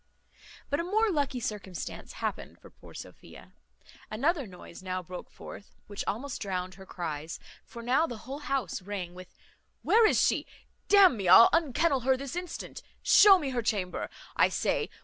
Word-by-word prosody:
But 285 Hz, -, +1 dB
a -, -, -1 dB
more 425 Hz, +4 st, +1 dB
lucky 285 Hz, -5 st, -1 dB
circumstance 200 Hz, -6 st, -6 dB
happened -, -, -5 dB
for -, -, -17 dB
poor -, -, -16 dB
Sophia; -, -, -12 dB, 0.6 s
another 280 Hz, +5 st, 0 dB
noise 180 Hz, -2 st, -12 dB
now 185 Hz, -1 st, -4 dB
broke 180 Hz, +1 st, -9 dB
forth, 205 Hz, -, -12 dB
which 205 Hz, -1 st, -6 dB
almost 255 Hz, +6 st, -4 dB
drowned 185 Hz, -2 st, -3 dB
her 190 Hz, +1 st, -14 dB
cries; 160 Hz, -2 st, -5 dB, 0.3 s
for 235 Hz, -, -11 dB
now 265 Hz, +7 st, +2 dB
the 240 Hz, -, -7 dB
whole 275 Hz, +3 st, -6 dB
house 275 Hz, -, -3 dB
rang 185 Hz, -2 st, -6 dB
with, 185 Hz, 0 st, -13 dB, 0.5 s
"Where 450 Hz, 0 st, +5 dB
is -, -, +2 dB
she? -, -, +1 dB, 0.4 s
D 410 Hz, -, +5 dB
n 380 Hz, -9 st, +7 dB
me, 195 Hz, -3 st, -3 dB
I'll 190 Hz, +6 st, +9 dB
unkennel 315 Hz, -2 st, +2 dB
her 260 Hz, +1 st, +2 dB
this 275 Hz, +2 st, -6 dB
instant. 355 Hz, 0 st, -6 dB, 0.2 s
Show 400 Hz, -2 st, +8 dB
me 290 Hz, -6 st, -3 dB
her 245 Hz, -2 st, -1 dB
chamber, 200 Hz, -5 st, -2 dB, 0.3 s
I -, -, +4 dB
say. -, -, -1 dB
240 Hz, 170 wpm, -29 LUFS, 185-290 Hz, 0.6 s, I'll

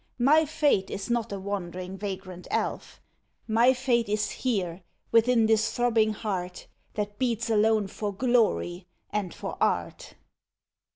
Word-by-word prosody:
My 295 Hz, +6 st, +5 dB
fate 285 Hz, -10 st, +2 dB
is 195 Hz, +4 st, -4 dB
not 235 Hz, -2 st, 0 dB
a 200 Hz, -, -4 dB
wandering, 185 Hz, -1 st, -5 dB
vagrant 185 Hz, -2 st, -6 dB
elf. -, -, -3 dB, 0.5 s
My 230 Hz, +3 st, +5 dB
fate 245 Hz, -4 st, +1 dB
is 210 Hz, -1 st, 0 dB
here, 190 Hz, -8 st, -2 dB, 0.3 s
within 230 Hz, 0 st, +4 dB
this 220 Hz, 0 st, +2 dB
throbbing 225 Hz, -3 st, +2 dB
heart 185 Hz, -4 st, -4 dB, 0.3 s
That 205 Hz, -1 st, -3 dB
beats 230 Hz, -3 st, 0 dB
alone 215 Hz, 0 st, +3 dB
for 205 Hz, +2 st, -4 dB
glory, 205 Hz, -6 st, +1 dB, 0.2 s
and 200 Hz, -4 st, -2 dB
for -, -, -6 dB
art. -, -, -1 dB
215 Hz, 130 wpm, -27 LUFS, 195-235 Hz, 0.5 s, My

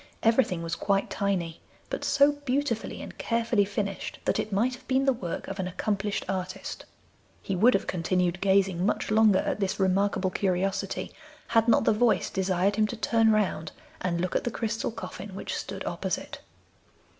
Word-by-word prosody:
Everything 225 Hz, -7 st, +3 dB
was 165 Hz, 0 st, -3 dB
quite 200 Hz, -1 st, 0 dB
tiny, 180 Hz, -5 st, -1 dB, 0.3 s
but -, -, -3 dB
so 280 Hz, +1 st, +5 dB
beautifully 285 Hz, -4 st, -2 dB
and -, -, -10 dB
carefully 230 Hz, -2 st, +2 dB
finished 200 Hz, -1 st, -3 dB
that -, -, +1 dB
it 215 Hz, -, -2 dB
might 230 Hz, +6 st, +2 dB
have 250 Hz, +1 st, -12 dB
been 265 Hz, +1 st, +2 dB
the 270 Hz, -, +4 dB
work 180 Hz, -8 st, -5 dB
of 195 Hz, 0 st, -6 dB
an 185 Hz, -, -1 dB
accomplished 205 Hz, +2 st, -2 dB
artist. 185 Hz, -1 st, -4 dB, 0.6 s
He 195 Hz, -, -2 dB
would 230 Hz, +7 st, +5 dB
have 195 Hz, -, 0 dB
continued 180 Hz, +1 st, 0 dB
gazing 190 Hz, -2 st, +3 dB
much 210 Hz, +1 st, 0 dB
longer 215 Hz, -2 st, +5 dB
at -, -, -1 dB
this 195 Hz, -1 st, -1 dB
remarkable 190 Hz, 0 st, +2 dB
curiosity 190 Hz, 0 st, -1 dB, 0.4 s
had 225 Hz, 0 st, +3 dB
not 235 Hz, -, +5 dB
the 225 Hz, -, +4 dB
voice 230 Hz, +1 st, +2 dB
desired 190 Hz, +1 st, +1 dB
him 215 Hz, 0 st, +3 dB
to 235 Hz, -, -6 dB
turn 225 Hz, 0 st, +3 dB
round 200 Hz, -7 st, 0 dB, 0.3 s
and 175 Hz, -2 st, -1 dB
look 180 Hz, +1 st, -2 dB
at -, -, +1 dB
the -, -, 0 dB
crystal 225 Hz, -1 st, -2 dB
coffin 205 Hz, -3 st, -8 dB
which -, -, -4 dB
stood -, -, -5 dB
opposite. -, -, -3 dB
200 Hz, 175 wpm, -27 LUFS, 185-225 Hz, 0.6 s, so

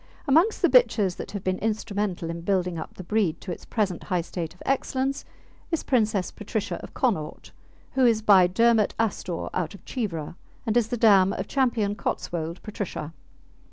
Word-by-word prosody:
Amongst 330 Hz, +11 st, +3 dB
the -, -, +7 dB
bitches 210 Hz, -, +4 dB
that -, -, -6 dB
have 200 Hz, -2 st, -6 dB
been 185 Hz, 0 st, -1 dB
instrumental 205 Hz, -5 st, -2 dB
in 170 Hz, 0 st, -6 dB
building 180 Hz, -2 st, 0 dB
up -, -, -8 dB
the 185 Hz, -, -8 dB
breed 185 Hz, -4 st, 0 dB
to 185 Hz, -, -6 dB
its -, -, -7 dB
present 195 Hz, -6 st, -1 dB
high 180 Hz, -3 st, 0 dB
state 165 Hz, 0 st, -5 dB
of -, -, -14 dB
excellence 270 Hz, 0 st, -1 dB, 0.4 s
is 330 Hz, -, -1 dB
Princess 215 Hz, -7 st, +1 dB
Patricia 210 Hz, 0 st, -3 dB
of -, -, -11 dB
Connaught 190 Hz, -, -1 dB, 0.4 s
who 265 Hz, -1 st, +1 dB
is 225 Hz, -3 st, +4 dB
by 190 Hz, -4 st, +7 dB
Dermot 225 Hz, +3 st, +3 dB
Astore 190 Hz, -6 st, -2 dB
out 170 Hz, +1 st, -2 dB
of -, -, -16 dB
Cheevra, 180 Hz, -, -4 dB, 0.3 s
and 220 Hz, -1 st, 0 dB
is 240 Hz, -3 st, +3 dB
the 245 Hz, -, -2 dB
dam 200 Hz, -4 st, +5 dB
of -, -, -4 dB
Ch. -, -, -11 dB, 0.4 s
Cotswold 170 Hz, 0 st, -3 dB
Patricia. 200 Hz, -7 st, -5 dB
200 Hz, 175 wpm, -26 LUFS, 175-225 Hz, 0.4 s, the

